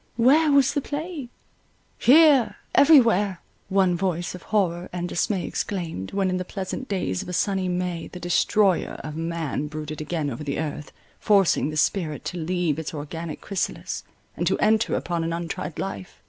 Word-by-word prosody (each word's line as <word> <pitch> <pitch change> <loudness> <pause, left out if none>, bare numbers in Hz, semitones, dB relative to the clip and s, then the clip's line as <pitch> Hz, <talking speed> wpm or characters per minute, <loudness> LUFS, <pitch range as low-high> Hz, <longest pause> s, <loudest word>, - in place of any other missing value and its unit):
Where 290 +6 +5
was 280 -1 +4
the 290 - 0
plague? 295 -2 -5 0.7
"Here—every 290 +1 +6
where!" 205 -6 +1 0.3
one 190 -2 +3
voice 175 -2 -2
of 180 - -9
horror 180 -5 0
and 175 0 -3
dismay 185 +2 -1
exclaimed, 165 - -4
when 195 -1 0
in 185 - 0
the 185 - -2
pleasant 190 +7 -5
days 180 - -1
of - - -8
a - - -4
sunny 190 0 0
May 180 -2 -2
the 180 - -9
Destroyer 180 +2 +2
of 155 0 -6
man 165 -3 -3
brooded 155 0 -6
again 155 -2 -2
over 125 +5 -6
the 140 -2 -3
earth, 150 -1 -4 0.3
forcing 195 -7 +3
the 155 - -4
spirit 155 -2 0
to 180 - -4
leave 170 -2 -1
its 160 0 -5
organic 155 +2 -6
chrysalis, 195 -3 -3 0.3
and - - -1
to - - +2
enter 220 +1 +2
upon 170 -1 -2
an 165 0 -2
untried 170 0 -4
life. 100 - -6
180 Hz, 170 wpm, -24 LUFS, 160-205 Hz, 0.7 s, Here—every